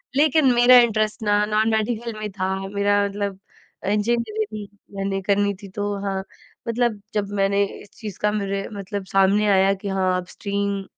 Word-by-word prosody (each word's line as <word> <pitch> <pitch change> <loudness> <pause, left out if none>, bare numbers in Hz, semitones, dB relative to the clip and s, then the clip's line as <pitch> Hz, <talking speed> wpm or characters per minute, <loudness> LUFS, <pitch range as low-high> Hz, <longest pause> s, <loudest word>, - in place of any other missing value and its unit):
लेकिन 290 -2 +4
मेरा 245 +1 +7
इंटरेस्ट 215 -2 +1
ना 205 0 +3
नॉन 215 +1 +1
मेडिकल 225 +1 -1
में 215 - -4
था। 190 0 -2
मेरा 205 0 +1
मतलब 200 -1 -4 0.4
अ, - - -5
इंजीनियरिंग 215 -1 -1 0.3
मैंने 195 0 -2
करनी 200 +1 +1
थी। 195 - -8
तो 205 0 -1
हाँ, 195 -1 -2 0.4
मतलब 230 -3 0
जब 205 -1 -1
मैंने 200 +1 +3 0.2
इस 205 - -15
चीज़ 210 -4 -7
का 210 - +1
मेरे 200 -1 -2
मतलब 200 0 -5
सामने 195 +2 +3
आया 195 0 +4
कि - - -3
हाँ, 190 -1 +1
अब 180 - -4
स्ट्रीम 200 0 -3
205 Hz, 170 wpm, -23 LUFS, 195-215 Hz, 0.4 s, मेरा